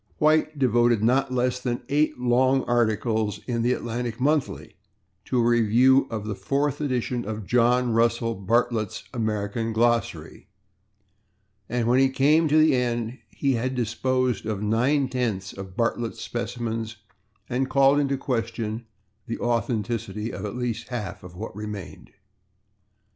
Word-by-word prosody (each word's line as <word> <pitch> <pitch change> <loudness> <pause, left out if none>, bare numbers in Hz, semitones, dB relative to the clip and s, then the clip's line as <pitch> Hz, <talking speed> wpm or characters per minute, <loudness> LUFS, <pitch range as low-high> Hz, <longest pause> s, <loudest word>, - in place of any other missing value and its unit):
White 155 0 +2
devoted 120 -4 +3
not 130 +3 +2
less 125 0 0
than 125 -1 -3
eight 150 0 +1
long 130 +2 +2
articles 110 -3 0
in 120 -2 -1
the 120 +2 +2
/Atlantic 120 -1 -4
Monthly/ 145 +2 -1 0.5
to 130 - -1
a - - +3
review 120 +3 +4
of 110 -2 -4
the 105 - -2
fourth 140 +10 -1
edition 125 -3 -1
of 110 -1 -5
John 125 +2 +3
[Pg010] - - 0
Russell 115 0 +2
Bartlett's 115 +1 0
American 110 -1 -2
Glossary, 115 -1 0 1.2
and 120 -1 0
when 125 +2 +4
he 135 0 +4
came 150 +5 +3
to 155 +1 +3
the 155 -3 +5
end 120 -1 -1
he 140 -2 0
had 130 +2 -1
disposed 125 -1 0
of 105 -2 -2
nine 130 +6 +2
tenths 115 -7 -2
of 95 -1 -9
Bartlett's 115 0 -1
specimens 115 -2 -4 0.5
and 130 +1 -1
called 135 +1 +4
into 140 -1 0
question 115 -3 -3 0.4
the 115 - -3
authenticity 115 -2 -2
of 100 - -5
at 105 - -5
least 120 -2 -3
half 115 -6 -5
of 90 -1 -12
what 105 +1 -7
remained. 105 -3 -7
120 Hz, 145 wpm, -25 LUFS, 110-130 Hz, 1.2 s, the